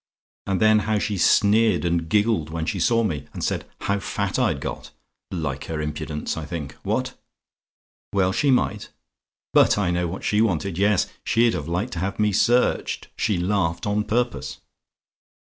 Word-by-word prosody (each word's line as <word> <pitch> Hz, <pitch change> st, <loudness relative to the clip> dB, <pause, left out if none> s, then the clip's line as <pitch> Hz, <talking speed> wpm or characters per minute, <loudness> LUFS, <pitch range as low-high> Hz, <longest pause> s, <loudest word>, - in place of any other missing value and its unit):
And 95 Hz, -2 st, 0 dB
then 110 Hz, 0 st, +5 dB
how 110 Hz, -, +2 dB
she 105 Hz, 0 st, -1 dB
sneered 105 Hz, +3 st, +3 dB
and 85 Hz, -1 st, 0 dB
giggled 105 Hz, -5 st, +2 dB
when 80 Hz, 0 st, -3 dB
she 95 Hz, +3 st, -2 dB
saw 115 Hz, +5 st, +3 dB
me, 75 Hz, -9 st, -3 dB
and -, -, -6 dB
said -, -, -2 dB
'how 100 Hz, 0 st, 0 dB
fat 95 Hz, -, -2 dB
I'd -, -, +1 dB
got:' -, -, -6 dB, 0.4 s
like 75 Hz, -7 st, -3 dB
her 80 Hz, -2 st, -4 dB
impudence, 75 Hz, 0 st, -3 dB
I 80 Hz, -, -5 dB
think. 75 Hz, -2 st, -5 dB
What? -, -, -1 dB, 1.0 s
"WELL 95 Hz, -2 st, +2 dB
SHE 130 Hz, +8 st, +1 dB
MIGHT? 130 Hz, -, +1 dB, 0.6 s
"But -, -, +5 dB
I 95 Hz, -4 st, +1 dB
know 90 Hz, 0 st, 0 dB
what 90 Hz, +4 st, -6 dB
she 105 Hz, +1 st, +2 dB
wanted; 95 Hz, -4 st, 0 dB
yes 100 Hz, -1 st, +3 dB, 0.2 s
she'd 115 Hz, 0 st, +3 dB
have 75 Hz, -, -4 dB
liked 90 Hz, +9 st, -2 dB
to 80 Hz, -, -4 dB
have 95 Hz, +3 st, -1 dB
had -, -, -22 dB
me 105 Hz, -1 st, +3 dB
searched. 120 Hz, +5 st, +1 dB
She 105 Hz, -4 st, 0 dB
laughed 90 Hz, -2 st, 0 dB
on 105 Hz, +1 st, 0 dB
purpose. 110 Hz, -, -2 dB
95 Hz, 175 wpm, -23 LUFS, 80-105 Hz, 1.0 s, then